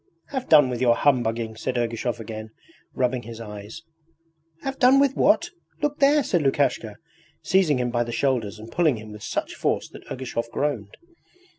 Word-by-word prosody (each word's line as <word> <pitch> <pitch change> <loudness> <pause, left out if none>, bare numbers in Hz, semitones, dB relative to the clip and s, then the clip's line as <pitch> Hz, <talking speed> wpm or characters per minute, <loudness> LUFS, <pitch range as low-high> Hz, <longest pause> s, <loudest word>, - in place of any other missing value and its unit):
'Have 260 -2 -4
done 150 -4 +7
with 120 - -3
your 120 -2 +4
humbugging!' 115 -5 +1
said 125 +3 -3
Ergushov 120 0 -2
again, 110 0 -7 0.5
rubbing 125 -1 0
his 115 0 -9
eyes. 105 +5 -9 0.8
'Have 270 0 -4
done 265 +1 +6
with 280 -1 +3
what? 340 +3 +3 0.3
Look 295 0 0
there,' 285 +1 +5
said 175 -8 +1
Lukashka, 135 -6 0 0.5
seizing 185 -7 +3
him 125 -1 -1
by 120 0 +1
the 120 - -6
shoulders 120 -6 0
and 110 +2 -11
pulling 155 -4 +2
him 110 0 -10
with 105 0 -10
such - - -3
force - - -1
that - - -13
Ergushov 120 -2 -4
groaned. 120 -8 -3
125 Hz, 170 wpm, -24 LUFS, 115-160 Hz, 0.8 s, done